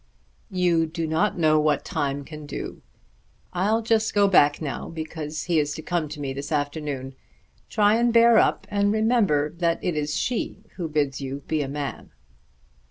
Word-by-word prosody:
"You 175 -4 +2
do 165 +1 -3
not 160 +6 0
know 155 -2 +4
what 150 -2 +1
time 140 0 -2
can 150 -1 -9
do. - - -6 0.7
I'll 210 +5 +1
just 220 -1 +1
go 205 -1 +5
back 145 -6 +4
now 150 -4 -4
because 160 -1 -5
he 170 -3 +2
is 145 0 -1
to 155 - -7
come 170 -3 -1
to 150 0 -7
me 135 -2 -3
this 140 +3 -6
afternoon. 145 -3 -2 0.6
Try 210 0 +3
and 240 0 +2
bear 230 -1 +6
up - - +2
and 205 0 +2
remember 215 -10 +2
that 170 -1 +1
it 175 - -1
is 150 0 -1
she 245 -2 -2
who 170 -4 -4
bids 145 -3 -1
you 135 +1 -5
be 155 -1 0
a 140 - -2
man." 140 0 -5
160 Hz, 175 wpm, -24 LUFS, 145-200 Hz, 0.7 s, bear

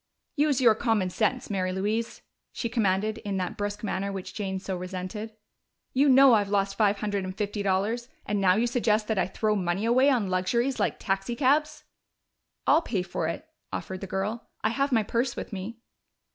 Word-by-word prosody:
"Use 290 -3 +2
your 235 -4 +6
common 215 -5 0
sense, 225 +4 -1
Mary 185 -2 0
Louise!" 210 +5 -2 0.3
she 235 - -3
commanded, 215 -1 0
in 200 -2 -3
that 185 -1 -2
brusque 205 +1 -4
manner 200 -1 -2
which 195 -2 -6
Jane 195 -3 -3
so 190 0 -4
resented. 185 +4 -6 0.6
"You 275 +2 +4
know 265 -1 +8
I've 205 -3 +3
lost 195 -1 +1
five 205 -2 +3
hundred 205 -2 -1
and 185 0 -6
fifty 205 0 -2
dollars, 205 +5 0 0.2
and 205 -1 -1
now 185 -1 +5
you 225 +3 +2
suggest 225 -3 +1
that 220 -3 +1
I 175 - +1
throw 215 +2 0
money 185 +1 -1
away 255 +4 +4
on 240 -7 +2
luxuries 235 +8 0
like - - 0
taxicabs!" 255 +10 0 0.8
"I'll 325 - +5
pay 205 - -2
for 180 -3 -3
it," 165 - -5 0.2
offered 185 -1 -5
the 195 - -5
girl. 200 +5 -3
"I 215 - +3
have 275 +4 0
my 225 -3 +3
purse 240 +4 -1
with - - -6
me." 200 +4 -5
210 Hz, 185 wpm, -27 LUFS, 190-235 Hz, 0.8 s, know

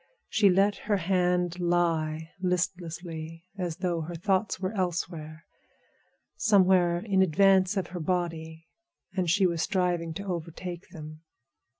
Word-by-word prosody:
She 205 -2 +4
let 195 +2 +3
her 205 - +4
hand 180 -1 +1
lie 165 -2 0
listlessly, 170 -2 -3
as 175 -3 -3
though 175 -3 -1
her 170 +2 -6
thoughts 190 +4 0
were 190 +2 -2
elsewhere—somewhere 170 -4 -3 1.6
in 195 -3 +2
advance 190 +2 +4
of 190 - 0
her 180 - -3
body, 165 -1 -3 0.5
and 185 -3 0
she 195 +3 +4
was 170 -3 0
striving 175 -3 0
to 200 +3 -5
overtake 175 0 -5
them. 155 -2 -10
175 Hz, 120 wpm, -28 LUFS, 165-185 Hz, 1.6 s, She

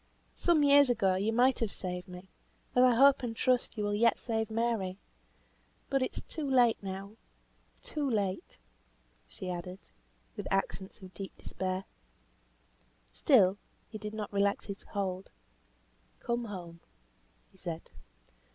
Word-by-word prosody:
Some 335 -4 +3
years 285 -1 +7
ago 210 -6 +3
you 200 +4 0
might 250 +3 +3
have 225 -3 -1
saved 180 0 -5
me, 180 +1 -10 0.5
as 250 - +6
I 250 -2 +6
hope 275 +3 +6
and 235 -3 -3
trust 250 0 +1
you 210 - -1
will 205 0 0
yet 230 +3 +3
save 220 -2 -2
Mary. 220 -5 -1 0.9
But 270 -1 +2
it 255 - -2
is - - -5
too 305 -4 -5
late 245 -4 +4
now; 195 +2 -6 0.7
too 295 -3 -2
late," 200 -5 -2 0.7
she 185 - -8
added, 180 +1 -5 0.6
with - - -5
accents 195 0 -2
of 185 0 -11
deep 195 -1 -8
despair. 185 0 -3 1.3
Still 205 - +4 0.3
he 215 - -7
did 210 0 -6
not 210 -1 -5
relax 200 0 +1
his 200 -1 -6
hold. 190 -2 -4 0.9
"Come 235 0 -2
home," 175 -5 -8 0.7
he 190 - -23
said. 170 -2 -6
210 Hz, 140 wpm, -31 LUFS, 190-240 Hz, 1.3 s, years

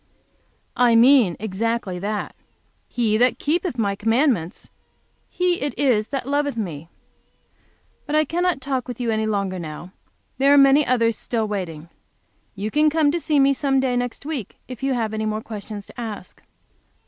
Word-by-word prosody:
"I 245 -2 +4
mean 235 - +5
exactly 220 -2 -2
that. 205 +2 -4 0.5
'He 225 -3 0
that 245 +2 +3
keepeth 330 -2 -1
my 200 -3 0
commandments 225 - 0 0.6
he 360 -1 0
it 285 - -3
is 235 -7 +2
that 270 -3 -4
loveth 285 -2 -1
me.' 165 -7 -5 1.2
But 295 - -1
I 310 0 +4
cannot 345 -1 0
talk 265 -1 -2
with 245 -1 -7
you 235 -2 -1
any 220 0 0
longer 200 -3 -1
now. 165 +2 -8 0.5
There 280 +2 +5
are - - +5
many 275 +1 +6
others 230 -2 +2
still 225 -3 -2
waiting. 170 -6 -5 0.7
You 205 +2 -4
can 305 +1 +3
come 300 -1 +2
to 340 - -1
see 305 -3 +1
me 275 0 +5
some 270 -1 +1
day 260 -2 0
next 245 +2 -3
week, 290 - -5
if 255 -1 -9
you 270 -1 0
have 220 -3 -2
any 220 0 -2
more 215 0 -3
questions 210 -1 -7
to - - -10
ask." 210 -5 -7
235 Hz, 170 wpm, -22 LUFS, 210-275 Hz, 1.2 s, many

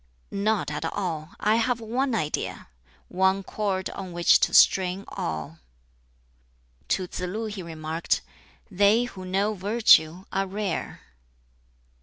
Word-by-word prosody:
"Not 205 0 0
at - - -4
all. 170 -4 -4
I 215 +2 +3
have 235 +1 +1
one 245 +3 -1
idea 155 -8 -3 0.4
one 190 +1 +1
cord 190 -1 -2
on 185 -2 -7
which 170 0 +5
to - - +2
string 190 +1 +4
all." 80 0 -5 1.3
To 185 - 0
Tsz 180 - -7
lu 185 +5 -3
he 210 -3 -5
remarked, 160 -1 -2 0.5
"They 205 +5 +4
who 195 -7 -8
know 195 +3 0
Virtue 190 -4 +4
are 195 0 -1
rare." 195 -2 -4
190 Hz, 125 wpm, -26 LUFS, 180-215 Hz, 1.3 s, which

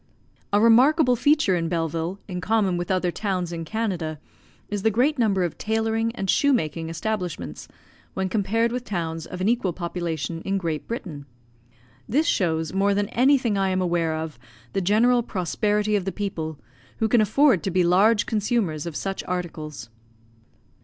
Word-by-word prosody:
A 205 - +4
remarkable 250 +5 +5
feature 285 -5 +3
in 165 -1 -1
Belleville, 165 +2 -2
in 180 -2 -5
common 210 -4 +1
with 175 0 -3
other 185 -2 +1
towns 185 -3 -2
in 165 -1 -4
Canada, 180 -6 -2 0.5
is 205 -1 -3
the 220 - +3
great 255 +7 +1
number 200 -5 +2
of 175 - -3
tailoring 225 +1 0
and 195 - -3
shoe 285 +8 +3
making 160 - -1
establishments, 165 - -4 0.5
when 190 0 -1
compared 225 +3 +1
with 250 0 -3
towns 165 -6 -4
of 180 - -7
an 190 - +1
equal 225 -6 +1
population 170 -2 -4
in 195 +2 -1
Great 165 -5 -3
Britain. 155 -11 -6 0.8
This 295 +8 +2
shows, 160 - 0
more 200 +1 +2
than 205 0 0
anything 250 -5 +3
I 195 0 +1
am 185 0 0
aware 170 -3 0
of, 155 -5 -5 0.3
the 195 - 0
general 230 +6 +3
prosperity 210 +1 0
of 195 -3 0
the 195 - -1
people, 165 -6 -4 0.4
who 225 - +1
can 230 +1 +4
afford 245 - +4
to - - -2
be 180 0 +2
large 205 +5 +4
consumers 210 - -1
of 165 - -6
such 195 +4 -3
articles. 155 -9 -5
195 Hz, 165 wpm, -24 LUFS, 170-225 Hz, 0.8 s, remarkable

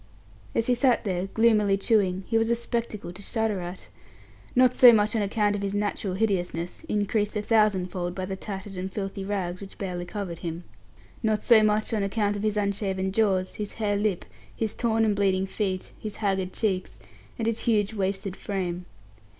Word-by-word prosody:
As 230 - +2
he 250 - +3
sat 245 0 +3
there 185 -3 -1
gloomily 210 -2 +3
chewing, 195 -3 +1
he 225 - -3
was 225 0 +3
a 235 - +3
spectacle 230 -5 -3
to 180 - -10
shudder 220 -1 -1
at. 180 +1 -7 0.7
Not 255 0 +5
so 250 -1 +9
much 215 0 +3
on 220 - +2
account 205 0 +1
of 200 - -3
his 200 0 -2
natural 205 -2 -1
hideousness, 180 - -1
increased 210 -4 0
a - - 0
thousand 210 -5 +2
fold 175 -1 -3
by 185 - -3
the 190 +1 -4
tattered 195 0 -7
and 185 +1 -4
filthy 195 0 -4
rags 190 -2 -3
which 195 - -10
barely 180 -3 -4
covered 180 -3 -5
him. 170 0 -5 0.6
Not 215 -2 +1
so 230 -2 +7
much 215 +1 +1
on 215 - +1
account 205 +1 0
of 205 - -4
his 215 0 0
unshaven 195 -2 -1
jaws, 190 -3 +1
his 210 -1 -5
hare 210 -2 0
lip, 205 -3 0 0.3
his 220 -2 -2
torn 225 -1 +1
and 210 -2 +2
bleeding 190 -1 +2
feet, 190 -1 -3
his 215 -1 -6
haggard 190 -3 -1
cheeks, 190 -4 -2 0.4
and 225 - -2
his 225 0 +1
huge, 215 -3 +1
wasted 195 -1 -2
frame. 180 -3 -4
205 Hz, 190 wpm, -26 LUFS, 190-220 Hz, 0.7 s, so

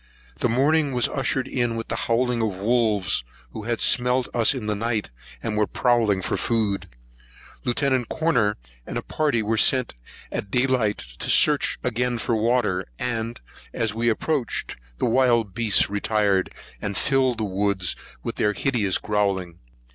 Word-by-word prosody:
The 125 - +1
morning 140 +4 +2
was 125 -2 +2
ushered 135 -1 -1
in 120 -3 -1
with 115 0 -5
the - - -1
howling 120 0 +1
of 110 -4 -1
wolves, 105 - +1 0.3
who 105 - -7
had 120 -1 -1
smelt 125 +1 +2
us 120 +4 +4
in 125 -5 -5
the 105 - 0
night, 110 - -2 0.3
when 105 -1 0
prowling 115 -6 +1
for - - -1
food. 110 -4 0 0.8
Lieut. 130 -1 0
Corner 125 -11 +1 0.3
and - - -4
a - - -3
party 145 -8 0
were 110 +1 0
sent 130 0 +3 0.4
at 100 - -4
day 125 +5 +2
light, 120 -6 +1 0.2
to - - -2
search - - +4
again 125 0 0
for 115 0 -1
water; 110 -5 +1
and, 115 -1 -3 0.3
as 110 -3 0
we 115 +1 +1
approached, 125 +1 -1 0.2
the - - 0
wild 120 -4 +2
beasts 115 -3 +3
retired, 100 -2 +1 0.3
and 100 -1 -3
filled 130 -3 +2
the 110 - -2
woods 100 -2 0 0.3
with - - -4
their 105 - +2
hideous 110 -7 +1
growling. 95 -5 -1
115 Hz, 155 wpm, -24 LUFS, 105-125 Hz, 0.8 s, us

